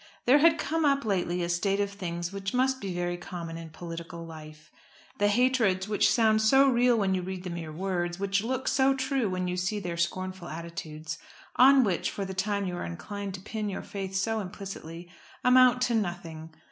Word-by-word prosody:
There 265 +4 +6
had 325 +2 +5
come 320 +1 -1
up 280 -3 +2
lately 180 -3 0
a - - -1
state 195 +3 +1
of 200 -1 0
things 175 -2 -4
which 195 +2 -4
must 260 +1 +1
be 195 - -3
very 175 0 -2
common 170 -2 -7
in 165 -1 -8
political 170 +1 -8
life. 155 -1 -12 0.5
The 205 - +4
hatreds 215 -4 +2
which 210 -1 +3
sound 220 -2 +4
so 270 +5 +5
real 245 -2 +4
when 195 -3 +1
you 185 - 0
read 185 0 -5
the 180 - -5
mere 165 -2 -5
words, 175 +1 -2
which 200 +1 0
look 260 +2 -2
so 270 0 +3
true 265 -4 0
when 185 0 -2
you 180 0 -2
see 200 +4 -1
their 175 -3 -4
scornful 185 +1 -2
attitudes, 160 0 -6 0.4
on 265 +1 +7
which 190 -6 0
for 200 - -4
the 190 - -5
time 200 +1 -1
you 180 -1 -3
are - - -4
inclined 200 - -5
to 185 - -9
pin 215 +1 -4
your 195 - -5
faith 195 -1 -6
so 220 +3 0
implicitly, 180 -4 -7 0.4
amount 250 0 +6
to 245 - +1
nothing. 175 -6 -3
195 Hz, 200 wpm, -28 LUFS, 175-225 Hz, 0.5 s, on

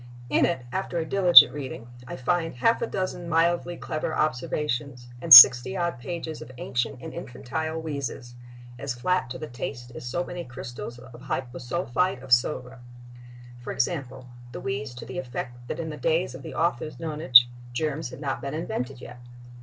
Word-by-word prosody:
In - - +3
it, 150 -8 -3
after 190 0 -3
a 165 - -1
diligent 180 0 +7
reading, 130 -5 -7 0.2
I - - -6
find 165 +5 -1
half 230 - +2
a 235 - -1
dozen 185 -4 -4
mildly 170 +1 +1
clever 155 0 -4
observations—and 125 -1 -3
sixty 125 +6 +11
odd 170 -7 -2
pages 160 +2 -6
of 130 - -10
ancient 125 0 -3
and 160 - -8
infantile 160 +2 -5
wheezes, 140 -5 -6 0.5
as 135 -3 -4
flat 180 +3 -1
to 125 - -6
the 155 - -6
taste 120 -2 -7
as - - -9
so 130 +9 -3
many 175 0 -7
crystals 120 -1 -8
of 125 0 -14
hyposulphite 130 +4 -3
of 135 - -12
soda. 125 +1 +1 0.8
For 120 - -7
example, 130 -3 -3 0.3
the - - -6
wheeze 130 -1 -5
to 120 - -9
the 130 - -6
effect 120 -1 -7
that - - -5
in 160 -1 -4
the 150 - -8
days 165 -2 0
of 130 - -10
the - - -9
author's 155 -2 -1
nonage 150 -6 +5 0.3
"germs 150 +2 -3
had 125 - -11
not 135 -2 -3
been 140 +2 -5
invented 135 -5 -5
yet." 125 0 -11
140 Hz, 170 wpm, -25 LUFS, 125-165 Hz, 0.8 s, sixty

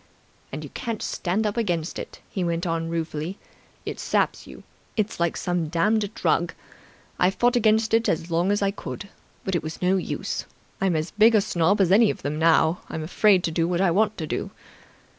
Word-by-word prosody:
"And - - -5
you - - -9
can't 230 -3 -4
stand 195 +5 -1
up 210 +2 -1
against 175 -7 -1
it," - - -8
he 190 - -3
went 170 0 -1
on 165 -1 -1
ruefully. 165 +2 -3 0.5
"It - - -5
saps - - 0
you. - - -12 0.3
It's 215 -3 -1
like 170 -1 0
some 175 -3 -1
damned 205 +6 +1
drug. - - +1 0.6
I 180 - +5
fought 240 +6 +2
against 220 -1 +3
it 225 0 +3
as 165 +1 -1
long 170 +4 +2
as 205 0 +1
I 195 - +2
could, 200 0 -7 0.3
but 190 - -2
it 175 - +1
was 155 0 -6
no 185 +1 +2
use. 185 - -3 0.3
I'm 190 -3 +2
as 155 +2 -2
big 220 +2 +5
a - - +6
snob 195 +1 +1
as 185 -2 +3
any 215 +2 +6
of - - -4
them 150 +2 -2
now. 160 +1 +3
I'm 160 - -4
afraid 185 +3 +3
to 165 - -1
do 165 +1 +1
what 175 0 0
I 190 -2 +3
want 215 +4 +2
to 160 - -3
do. - - -3
180 Hz, 205 wpm, -24 LUFS, 165-210 Hz, 0.6 s, a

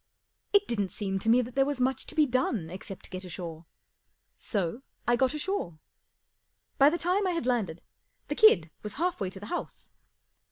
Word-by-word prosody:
It 405 0 +5
didn't 205 -5 -1
seem 195 -1 -2
to 220 - -1
me 245 +2 +5
that 240 +1 -8
there 270 - +4
was 280 -1 -2
much 260 +1 0
to - - -7
be 310 -2 +5
done 245 - 0
except 190 +1 -8
get 185 +1 -5
ashore, 170 -2 -7 0.7
so 200 +3 -1 0.2
1 240 - +4
gut 265 +3 +2
ashore. 300 - -2 1.0
By 275 +1 +8
the 340 - -1
time 370 +4 +1
I 360 - +1
had 335 -7 -2
landed, 215 -10 -1 0.4
the - - -1
kid 175 - +6
was 210 -1 -5
half 350 -1 -1
way 190 - 0
to 190 - -10
the 205 - -8
house. - - -6
240 Hz, 190 wpm, -29 LUFS, 190-295 Hz, 1.0 s, By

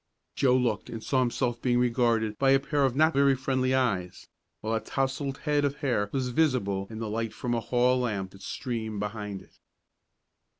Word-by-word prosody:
Joe 130 -2 +3
looked, 120 -5 -1
and 115 -1 -6
saw 130 - +1
himself 120 -1 0
being 120 -1 +2
regarded 115 -3 +1
by 135 - +3
a 135 0 +6
pair 145 0 +1
of 130 -2 0
not 155 +3 +4
very 140 0 +4
friendly 130 0 0
eyes, 100 -9 -1 0.3
while 110 +1 -2
a 110 - +1
tousled 135 +2 -2
head 150 -2 0
of 140 -1 0
hair 120 -9 -1
was 130 -2 -1
visible 120 -9 +1
in 110 - -8
the 110 0 -4
light 115 +1 -3
from 120 - -2
a 120 - +1
hall 125 +2 +2
lamp 100 -6 -2
that 95 - -15
streamed 115 -1 -4
from - - -4
behind 105 -2 -5
it. - - -26
125 Hz, 200 wpm, -28 LUFS, 110-135 Hz, 0.3 s, a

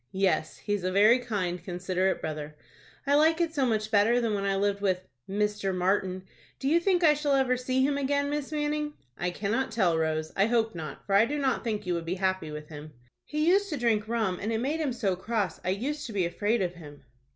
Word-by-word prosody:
"Yes, 190 -4 0
he 205 - -3
is 205 -3 -2
a 185 - 0
very 210 +6 +5
kind, 185 -8 -3
considerate 185 +1 -1
brother." 150 -1 -5 0.5
"I 280 - +2
like 320 +3 +4
it 335 -2 0
so 275 -4 +1
much 215 -2 -1
better 220 +4 +4
than 230 -3 0
when 200 -1 -1
I 195 0 +1
lived 200 0 0
with—Mr. 195 +3 -2
Martin. 185 0 0 0.3
Do 270 - -3
you 325 +4 +4
think 360 0 +2
I 305 -2 +7
shall 295 -1 0
ever 260 -2 +2
see 255 +1 0
him 285 +1 +1
again, 285 +1 +1
Miss 295 0 -3
Manning?" 300 0 -1 0.2
"I 175 - -2
cannot 215 +8 -1
tell, 190 -7 +2
Rose. 155 0 -1
I 195 +2 +3
hope 230 -1 +1
not; 155 -4 -7
for 195 - -2
I 200 +3 +6
do 295 +3 -2
not 270 -3 0
think 215 -3 -2
you 180 - 0
would 170 -1 -3
be 175 +2 -2
happy 185 -3 -1
with 150 0 -8
him." 150 0 -9 0.3
"He 305 +1 -1
used 400 +3 +4
to 300 - -2
drink 225 -3 +1
rum, 220 -6 -1
and 215 - -2
it 225 - 0
made 280 +7 -1
him 300 -4 0
so 205 -6 0
cross 200 -2 -2
I - - -1
used 270 +10 -2
to 225 - -8
be 190 -3 +1
afraid 205 +5 0
of 175 -1 -2
him." 145 -5 -12
210 Hz, 230 wpm, -28 LUFS, 185-265 Hz, 0.5 s, I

